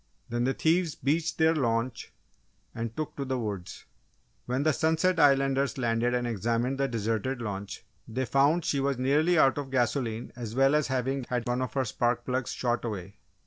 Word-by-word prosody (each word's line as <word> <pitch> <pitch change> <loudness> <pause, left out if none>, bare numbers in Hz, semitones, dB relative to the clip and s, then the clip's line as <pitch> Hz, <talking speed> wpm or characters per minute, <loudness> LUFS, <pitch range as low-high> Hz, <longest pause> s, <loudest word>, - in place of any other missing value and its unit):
Then 120 +1 0
the 135 - 0
thieves 165 -1 +1
beached 160 +4 0
their 160 0 +4
launch 120 -4 -1 0.6
and 115 0 -5
took 155 - -4
to 140 - -2
the 130 -1 -2
woods. 105 -6 -5 0.6
When 130 +3 0
the 155 - +4
Sunset 160 +3 +1
Islanders 135 -2 +3
landed 120 0 +1
and 125 0 0
examined 120 +4 -1
the 135 - +2
deserted 115 +2 -2
launch, 100 -3 -5 0.2
they 130 +4 -2
found 145 +6 +2
she 140 - +1
was 135 -1 0
nearly 150 +7 +2
out 135 -2 +4
of 140 -2 -5
gasoline 120 -2 -1
as 115 -2 -6
well 135 +2 +4
as 150 -1 +2
having 130 0 -1
had 125 -1 -2
one 120 +1 0
of 130 - -3
her 135 -2 0
spark 120 +1 0
plugs 130 0 -1
shot 120 -1 -1
away. 100 -4 -5
130 Hz, 185 wpm, -28 LUFS, 115-140 Hz, 0.6 s, their